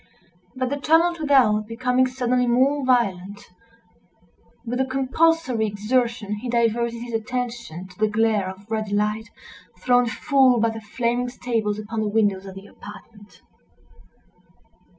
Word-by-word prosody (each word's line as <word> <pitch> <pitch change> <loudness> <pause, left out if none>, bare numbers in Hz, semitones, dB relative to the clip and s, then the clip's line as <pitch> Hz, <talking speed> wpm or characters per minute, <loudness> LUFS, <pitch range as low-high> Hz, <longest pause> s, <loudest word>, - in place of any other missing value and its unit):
But 255 0 -2
the 285 - -1
tumult 335 +3 +3
without 245 -8 +3
becoming 250 +2 +1
suddenly 250 -1 0
more 265 +4 +2
violent, 205 -6 0 1.3
with 245 +3 -2
a - - +1
compulsory 265 -2 +1
exertion 215 0 -1
he 240 +4 -6
diverted 235 0 0
his 240 -1 -8
attention 235 -5 -4
to 185 +1 -19
the 215 - +3
glare 210 -2 +1
of 190 +2 -11
ruddy 215 -2 -2
light 210 +1 -1 0.5
thrown 245 -1 +2
full 260 0 +3
by 230 0 +2
the 225 0 -8
flaming 235 +3 -2
stables 225 -4 -2
upon 220 +1 -4
the 215 - -1
windows 205 -2 0
of 190 - -9
the 195 +1 -10
apartment. 205 0 -14
230 Hz, 135 wpm, -23 LUFS, 210-255 Hz, 1.3 s, tumult